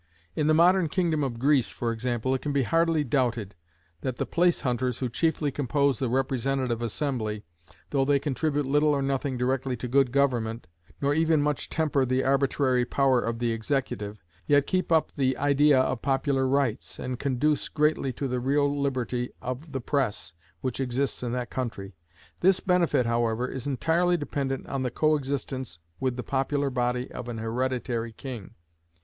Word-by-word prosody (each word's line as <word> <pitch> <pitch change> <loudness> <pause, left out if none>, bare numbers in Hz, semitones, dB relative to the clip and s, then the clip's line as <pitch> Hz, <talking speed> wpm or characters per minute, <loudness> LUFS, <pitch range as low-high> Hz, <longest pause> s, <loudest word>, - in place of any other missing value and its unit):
In 150 - +1
the 155 - +4
modern 175 +1 +4
kingdom 165 -3 +1
of 125 -4 -2
Greece, 135 0 +3
for 120 -1 -2
example, 120 +2 -1
it 130 - -1
can 145 -1 -3
hardly 165 +3 +2
be 135 - -10
doubted, 120 -7 0 0.5
that 130 -2 -2
the - - -1
place 175 0 +2
hunters 125 -1 -1
who 125 - -2
chiefly 150 +3 0
compose 140 0 +1
the 130 - 0
representative 130 -1 0
assembly, 115 -3 -2 0.5
though 140 -2 +2
they 140 +1 +3
contribute 145 +1 -1
little 145 +3 +3
or 140 - 0
nothing 135 -1 -1
directly 130 0 -1
to 125 - -5
good 135 0 +3
government, 120 -6 0 0.4
nor 140 +1 +3
even 160 0 +3
much 145 -1 -1
temper 150 -4 +1
the 130 +1 +1
arbitrary 135 -1 +2
power 130 0 +2
of 115 0 -2
the 120 0 0
executive, 110 - -3 0.2
yet 145 -1 +4
keep 185 +1 -1
up 160 -1 +3
the 130 -2 +1
idea 145 -1 +4
of 130 -2 0
popular 135 -1 +1
rights, 135 -3 0
and 125 -1 -4
conduce 140 +2 0
greatly 150 -3 +1
to 135 +2 -3
the 125 -1 -1
real 140 +3 +1
liberty 125 -3 -1
of 130 +5 -6
the 135 -2 -3
press 125 - -1 0.3
which 130 0 -3
exists 135 +1 -1
in 120 -1 -2
that 125 -1 -3
country. 110 -6 -4 0.5
This 190 +1 +4
benefit, 170 -8 +2
however, 115 +1 0
is 130 +1 -5
entirely 170 +6 +2
dependent 140 -3 -3
on 135 - -3
the 130 - 0
coexistence 135 - -1 0.2
with 130 -2 0
the 125 - -4
popular 140 +2 0
body 125 0 -1
of 125 - -7
an 115 - -4
hereditary 120 0 -2
king. 120 -5 -8
135 Hz, 170 wpm, -27 LUFS, 125-145 Hz, 0.5 s, the